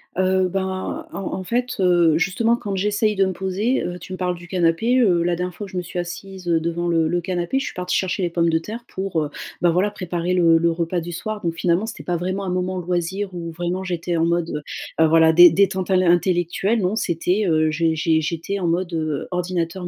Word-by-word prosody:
Heu, 185 0 +2
ben, 190 0 -3
en - - -5
en 190 - -4
fait, 245 +5 -1
heu, 175 -4 +4
justement 225 +6 +2
quand 205 -4 -4
j'essaye 210 +2 +1
de 195 -1 +3
me 190 - -1
poser, 195 +7 -1
heu, 175 0 -4
tu 180 +2 -9
me - - -5
parles 180 -1 -1
du 175 0 -12
canapé, 185 +8 +2
heu, 180 -7 +3
la 175 0 +1
dernière 180 0 -4
fois 205 - -6
où - - -10
je 185 - -7
me 180 - 0
suis 180 +1 -8
assise, 180 +1 -6
heu, 165 -1 +3
devant 170 +1 -2
le 165 -2 +2
le 175 +2 0
canapé, 180 +7 -2
je 270 - -1
suis - - -5
partie 180 0 -1
chercher 190 0 -1
les 175 - 0
pommes 170 0 +1
de 160 - +2
terre 230 +7 -8
pour, 190 -4 -2
heu, 145 - -4 0.3
bah, 175 -1 +4
voilà 185 +5 +2
préparer 180 -2 -3
le 165 -2 +5
le 170 0 +2
repas 170 +1 -1
du 175 +1 -6
soir. 215 +5 -5
Donc 165 -1 -2
finalement 175 +5 +1
c'était - - -7
pas 175 -1 -1
vraiment 185 +3 -3
un 190 - -3
moment 185 +1 -1
loisir 180 +2 -2
où 170 -1 -5
vraiment 175 +3 -3
j'étais 175 -1 -2
en 165 - +2
mode, 170 -3 -1 0.4
heu, 160 - +6
voilà 160 0 +5
dé 175 +1 +9
détente 190 +2 +1
à 190 - +3
l'in 185 -2 +4
intellectuelle. 175 +5 +1
Non 185 +4 0
c'était, 180 +2 0
heu, 155 -1 +2
j'é 160 +1 +1
j'é 160 0 +2
j'étais 170 +5 -3
en 175 - -1
mode, 175 +1 -1
heu, 155 -3 -2
ordinateur 180 0 -2
180 Hz, 240 wpm, -22 LUFS, 170-190 Hz, 0.4 s, dé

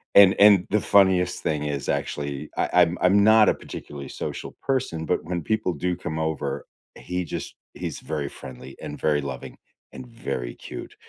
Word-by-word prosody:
and 100 -1 +9
and 100 -3 +7
the 105 - +3
funniest 95 -3 +3
thing 75 -1 -1
is 70 -2 -3
actually, 70 0 -3
I - - +1
I'm 90 0 +4
I'm 100 +2 +5
not 110 0 +7
a - - +4
particularly 70 -2 -9
social - - -6
person, 125 -12 -1
but 90 - 0
when 85 -1 -3
people 110 -1 0
do 90 +3 -1
come 80 -3 -5
over, 80 -3 -2 0.3
he 90 0 -3
just - - -5 0.2
he's - - -5
very 75 -3 -3
friendly 65 0 -10
and 75 - -7
very 75 -2 +2
loving 65 -3 -7 0.4
and 130 - -9
very 70 - -5
cute, - - -9
85 Hz, 175 wpm, -25 LUFS, 75-95 Hz, 0.4 s, and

